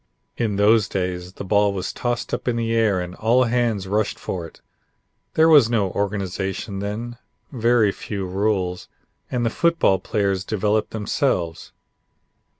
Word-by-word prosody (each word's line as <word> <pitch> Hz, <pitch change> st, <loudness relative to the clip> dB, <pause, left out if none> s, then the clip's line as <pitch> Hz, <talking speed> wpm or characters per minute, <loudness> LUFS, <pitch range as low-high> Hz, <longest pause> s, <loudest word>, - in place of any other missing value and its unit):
In 110 Hz, -4 st, -1 dB
those 105 Hz, 0 st, +4 dB
days 90 Hz, -1 st, -3 dB
the -, -, -7 dB
ball 100 Hz, +1 st, +2 dB
was 95 Hz, -2 st, -4 dB
tossed 120 Hz, -1 st, -3 dB
up -, -, -3 dB
in 120 Hz, -, +1 dB
the 115 Hz, -1 st, -1 dB
air 110 Hz, -4 st, +2 dB
and 90 Hz, 0 st, -5 dB
all 115 Hz, +6 st, +3 dB
hands 115 Hz, -5 st, 0 dB
rushed 105 Hz, +2 st, 0 dB
for 85 Hz, -3 st, -5 dB
it. -, -, -19 dB, 0.8 s
There 160 Hz, +1 st, +5 dB
was 145 Hz, -8 st, +7 dB
no 105 Hz, -6 st, +1 dB
organization 100 Hz, 0 st, -3 dB
then, 115 Hz, +4 st, -5 dB, 0.3 s
very 115 Hz, -4 st, +3 dB
few 100 Hz, 0 st, -5 dB
rules, 95 Hz, -1 st, -1 dB, 0.4 s
and 120 Hz, -2 st, -1 dB
the 115 Hz, -, +1 dB
football 165 Hz, -, +2 dB
players 100 Hz, -1 st, -1 dB
developed 105 Hz, +1 st, 0 dB
themselves. 100 Hz, -, -2 dB
105 Hz, 150 wpm, -22 LUFS, 95-115 Hz, 0.8 s, was